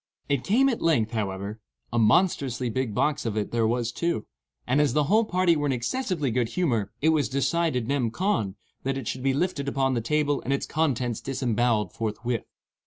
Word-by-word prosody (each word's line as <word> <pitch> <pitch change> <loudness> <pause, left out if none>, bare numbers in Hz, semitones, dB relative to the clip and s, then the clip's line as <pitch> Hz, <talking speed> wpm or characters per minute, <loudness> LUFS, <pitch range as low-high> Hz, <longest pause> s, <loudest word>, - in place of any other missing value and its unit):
It 140 -3 +1
came 250 +7 +3
at 245 -4 0
length, 125 -10 +2
however,—a 105 +2 -4
monstrously 125 - +2
big 125 -3 -2
box 150 +4 +1
of 110 -2 -2
it 105 - -2
there 115 -1 +2
was, 120 0 0
too—and 145 -2 -2
as 145 -5 +2
the 150 +1 +3
whole 215 +10 +3
party 185 -4 +3
were 145 -1 0
in - - +1
excessively 145 - -1
good 120 -1 0
humor, 115 - 0
it 160 - +5
was 150 -7 +2
decided, 140 -2 0
nem. 135 -4 +1
con., 140 - -1 0.3
that 135 0 -1
it 130 -5 -5
should 130 - -3
be 135 0 +1
lifted 145 -3 -1
upon 135 -1 +1
the 120 - 0
table 145 +4 +1
and 135 - -1
its 140 - -1
contents 130 -7 -1
disembowelled 120 -6 0
forthwith. 115 +1 -3
130 Hz, 185 wpm, -26 LUFS, 115-150 Hz, 0.3 s, it